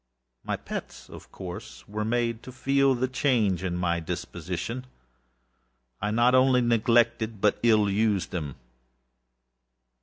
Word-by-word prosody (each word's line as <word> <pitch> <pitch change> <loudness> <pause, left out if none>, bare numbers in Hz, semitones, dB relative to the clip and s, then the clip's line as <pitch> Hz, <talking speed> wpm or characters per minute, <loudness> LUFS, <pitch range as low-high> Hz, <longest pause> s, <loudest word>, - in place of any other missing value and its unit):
My - - -2
pets, - - -8
of - - -12
course, 90 -1 -9
were 105 +1 -3
made 115 0 0
to 130 - -10
feel 135 +1 +2
the 130 +1 0
change 115 - +1
in 90 -2 -2
my 85 -1 0
disposition. 90 +9 -5 1.1
I 105 - 0
not 120 +3 +3
only 130 0 +5
neglected, 115 -1 +2
but 105 +1 +2
ill 110 -3 +4
used 100 -2 +1
them. 75 -7 -4
110 Hz, 125 wpm, -27 LUFS, 95-125 Hz, 1.1 s, only